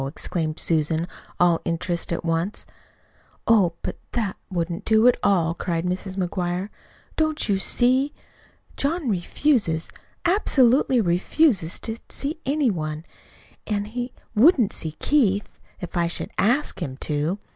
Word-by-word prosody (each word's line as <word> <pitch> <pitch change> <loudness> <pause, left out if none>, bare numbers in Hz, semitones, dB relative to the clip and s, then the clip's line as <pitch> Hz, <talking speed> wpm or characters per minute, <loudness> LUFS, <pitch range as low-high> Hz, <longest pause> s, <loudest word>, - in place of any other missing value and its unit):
exclaimed 155 +2 -3
Susan, 160 +1 +1 0.3
all 175 -2 +4
interest 170 +1 -2
at 170 - -2
once. 165 +5 -1 0.8
"Oh, 200 -7 +4
but - - -4 0.2
that 215 -6 -1
wouldn't 170 -1 -3
do 220 +1 +4
at 250 - +6
all!" 170 -4 +2
cried 170 -1 -2
Mrs. 185 +1 -3
McGuire. 180 +1 -2 0.5
"Don't 310 -1 0
you 200 -2 +1
see? 255 +7 +3 0.6
John 295 -1 -1
refuses, 190 - +1 0.3
absolutely 265 - +3
refuses, 185 - +2
to 225 0 -4
see 295 +3 -3
any 280 -3 +2
one; 155 -3 -4 0.6
an' 205 -1 -1
he 245 +4 -5 0.2
wouldn't 240 - +5
see 160 -2 -4
Keith, 205 - +2 0.3
if 180 - -7
I 170 -1 +2
should 170 - -4
ASK 245 +10 +1
him 130 -2 -4
to. 150 +5 -1
190 Hz, 130 wpm, -24 LUFS, 170-245 Hz, 0.8 s, at